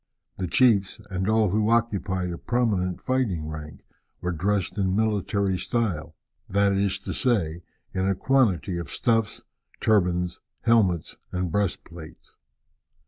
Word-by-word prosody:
The 95 - -1
chiefs, 100 -2 +3
and 95 +2 -1
all 110 -3 +3
who 105 +2 +2
occupied 100 -6 +1
a 85 - -6
prominent 105 -7 0
fighting 110 -12 -1
rank, 75 0 -7 0.4
were 90 - -2
dressed 95 +3 0
in 95 -1 +1
military 100 -3 +1
style 105 -10 -2 0.3
that 100 +1 +3
is 100 0 +1
to - - -4
say, 95 -11 0 0.3
in 95 0 0
a 95 - +2
quantity 100 -8 +2
of 85 -4 -6
stuffs, 115 +2 0 0.4
turbans, 90 -4 +1 0.2
helmets, 105 -8 +2
and 90 -2 -2
breastplates. 85 -4 -4
95 Hz, 130 wpm, -25 LUFS, 90-110 Hz, 0.4 s, chiefs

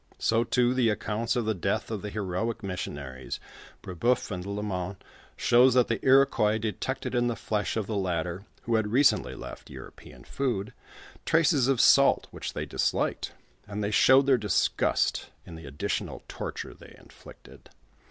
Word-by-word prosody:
So 115 +1 +2
too 125 +1 +2
the 125 -3 +2
accounts 110 +3 -1
of 120 -2 0
the 110 - +1
dcatli 95 +3 -2
of 105 -3 -3
the 105 - -5
heroic 105 +3 -3
missionaries 70 -9 -5 0.4
Brebeuf 115 +7 0
and 90 -2 -4
Lalemant 100 -1 -4 0.4
shows 125 +1 +5
that 125 -2 +4
the 115 - -2
Iro 135 +1 +6
quois 105 -4 +1
detected 115 +6 -3
in 120 -1 +2
the 120 - -1
flesh 105 0 -2
of 110 - -1
the 110 - -4
latter, 90 -1 -2 0.2
who 115 - -2
had 110 -1 0
recently 130 +6 +2
left - - -10
European 65 -1 -12
food, 120 - -3 0.5
traces 150 -5 +3
of 135 -3 +2
salt 140 +1 +5
which - - -6
they - - -3
disliked, - - -1 0.3
and 105 +1 -4
they 100 - -1
showed 130 +5 +6
their 135 -3 +4
disgust 105 -1 +1 0.2
in - - -11
the 80 -3 -10
additional 70 +1 -4
torture - - -6
they - - -15
inflicted. - - -16
110 Hz, 160 wpm, -27 LUFS, 95-125 Hz, 0.5 s, Iro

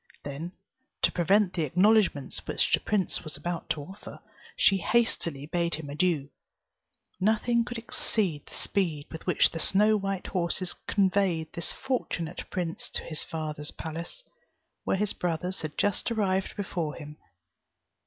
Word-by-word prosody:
Then, 150 +6 -5 0.5
to - - +5
prevent 190 +2 +3
the 170 - -1
acknowledgments 180 -1 +3
which - - +1
the - - +6
prince 200 -3 0
was 155 -3 -6
about 170 +3 -4
to 145 - -1
offer, 190 +7 -10 0.4
she 195 - +5
hastily 175 -9 +1
bade 170 +2 0
him 150 -2 -6
adieu. 155 -3 +1 0.9
Nothing 220 +4 +3
could 245 0 -5
exceed 205 -8 -1
the - - -9
speed 165 -7 0
with 160 - -8
which 180 - +5
the 165 - -4
snow 210 +6 +4
white 195 -2 -2
horses 180 0 -1
conveyed 190 -5 +2
this 170 - -2
fortunate 180 -10 -3
prince 175 -3 -3
to - - -1
his 155 -2 -3
father's 155 -2 -4
palace, 165 - -6 0.6
where - - +2
his 210 0 0
brothers 180 +2 -2
had 155 -1 -5
just 205 +3 +1
arrived 195 -4 +1
before 175 -6 -2
him. 150 -1 -9
175 Hz, 145 wpm, -29 LUFS, 160-200 Hz, 0.9 s, the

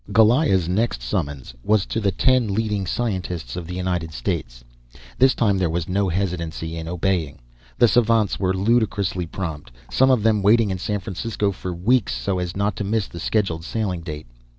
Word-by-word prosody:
Goliah's 110 - +4
next 90 - 0
summons 70 +1 -3
was 105 -2 +2
to - - -2
the 100 -3 +1
ten 120 -1 +2
leading 105 -3 -1
scientists 90 - -3
of 85 -2 -5
the 90 - -5
United 90 -3 -2
States. - - -4 0.6
This 130 0 +5
time 100 -5 +2
there 90 -3 +1
was 80 0 -2
no 95 +1 +1
hesitancy 85 -3 -3
in 80 0 -5
obeying. 90 -3 -1 0.4
The 120 - +6
savants 115 -3 +2
were 95 -2 +1
ludicrously 100 -4 +1
prompt, 80 -7 -5 0.2
some 130 +1 +4
of 125 -5 +3
them 110 -2 +3
waiting 105 +1 +4
in 95 - -3
San 105 +2 -2
Francisco 105 +1 -2
for 95 -1 -6
weeks 105 +7 +1
so 95 -2 -1
as 90 +1 -4
not 100 -1 0
to - - -2
miss 105 0 0
the 85 - -9
scheduled 85 -4 0
sailing 95 -3 -2
date. 75 -3 -7
95 Hz, 180 wpm, -22 LUFS, 85-110 Hz, 0.6 s, The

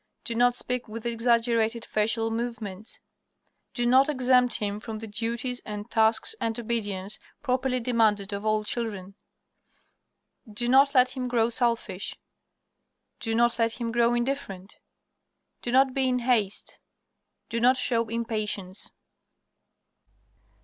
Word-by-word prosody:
Do 235 - -3
not 245 +1 +3
speak 250 0 -2
with 225 +2 -8
exaggerated 230 -1 +1
facial 225 +1 +1
movements. 225 -3 -5 0.8
Do 240 -2 0
not 260 +4 +5
exempt 250 -3 +3
him 205 0 -2
from 220 0 -6
the 225 - -7
duties 230 +3 -3
and 210 +1 -7
tasks 220 - +2
and 225 0 -1
obedience 210 -4 -3 0.2
properly 255 -1 0
demanded 220 -4 +1
of 200 +1 -4
all 215 0 +1
children. 210 -4 -4 1.4
Do 240 +3 -2
not 275 +3 +5
let 255 0 +5
him 255 -1 -3
grow 235 -1 +1
selfish. 230 -5 -1 1.0
Do 225 -1 -1
not 235 +1 +2
let 230 0 +2
him 235 -1 -3
grow 235 +1 +3
indifferent. 235 -7 -3 0.9
Do 240 - -3
not 265 +1 +4
be 265 -1 +1
in 250 - +1
haste. 235 -5 0 0.7
Do 230 - -1
not 250 +2 +4
show 230 -2 +1
impatience. 215 -4 -3
230 Hz, 130 wpm, -27 LUFS, 215-245 Hz, 1.4 s, not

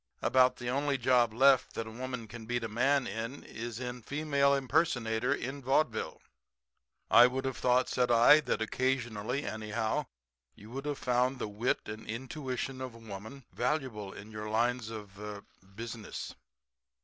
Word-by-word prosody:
About 130 +1 +5
the 120 - -7
only 140 +2 +1
job 125 -2 +3
left 130 +2 +4
that 115 - -2
a 110 - -8
woman 125 -1 -5
can 110 0 -9
beat 120 0 -1
a - - -1
man 130 +5 +2
in 115 +6 -5
is 115 0 -6 0.3
female 140 0 +2
impersonator 125 -4 +1
in 140 0 -2
vaudeville." 130 -2 0 0.9
"I 120 +1 +9
would 130 +1 -3
have 130 -1 -2
thought," 125 0 +3
said 125 -1 +1
I, 120 +6 +7
"that 125 -6 -1
occasionally, 125 +1 -1
anyhow, 110 0 -2 0.5
you 105 +3 -13
would 135 +3 -5
have 145 -1 -1
found 125 +2 +1
the 120 - -3
wit 105 +4 0
and 110 +1 -7
intuition 130 +2 -4
of 130 -3 -5
woman 110 +4 -9
valuable 125 -6 -1
to - - -11
you - - -7
in 110 - -14
your 105 0 -5
lines 120 +1 +1
of 105 -3 -9
er 105 -1 -7 0.3
business." 115 -1 -6
120 Hz, 160 wpm, -31 LUFS, 110-130 Hz, 0.9 s, I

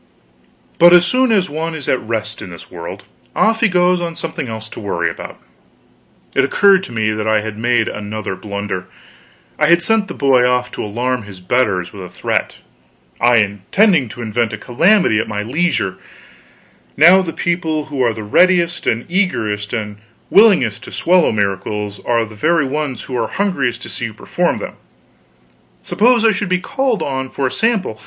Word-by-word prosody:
But 175 +1 +8
as 175 0 +6
soon 255 +4 +2
as 195 -4 +2
one 160 +1 -4
is 145 -4 -7
at 130 - +1
rest, 110 -1 -4
in 95 - -8
this 85 -2 -12
world, 85 -2 -8 0.3
off 225 +1 +2
he 225 - +4
goes 180 -1 +2
on 170 -1 -4
something 160 -5 -5
else 110 -1 -7
to - - -9
worry 85 -5 -2
about. - - -9 1.0
It - - +3
occurred 195 -2 +4
to - - -11
me 110 -2 0
that 110 0 -3
I 110 -1 +2
had 110 -1 -6
made 120 +1 +1
another 105 -1 -5
blunder: 100 -1 -5 0.7
I 150 - +3
had 170 +1 +4
sent 220 +2 +2
the - - -7
boy 135 -3 +3
off 125 0 +1
to - - -5
alarm 120 +4 -2
his 100 -3 -12
betters 90 -3 0
with 100 - -9
a 90 - -8
threat - - -2 0.6
I 120 0 +4
intending 125 - +2
to 120 +2 -8
invent 115 0 -1
a - - -4
calamity 125 - +2
at - - -2
my 105 -1 -3
leisure; 125 - -1 1.0
now 175 +6 +7
the 175 -3 -4
people 160 -3 -2
who 135 - -1
are 120 -2 +3
the 110 -1 -7
readiest 175 - +2
and 115 +1 0
eagerest 110 - -1
and 105 -3 -4 0.3
willingest 190 - +4
to - - -10
swallow 180 0 +2
miracles 105 0 -2
are 115 -1 +2
the 110 - -13
very 155 +7 +1
ones 140 -3 -3
who 130 - -6
are 115 -2 -1
hungriest 135 - -2
to - - -8
see 120 - -4
you 110 -2 -7
perform - - -1
them; - - -6 1.1
suppose 235 +1 +2
I 225 - +6
should 205 -2 -3
be 185 - +2
called 260 +2 -1
on 130 -1 -3
for 135 - -3
a 130 - 0
sample? 220 - 0
125 Hz, 185 wpm, -17 LUFS, 110-175 Hz, 1.1 s, But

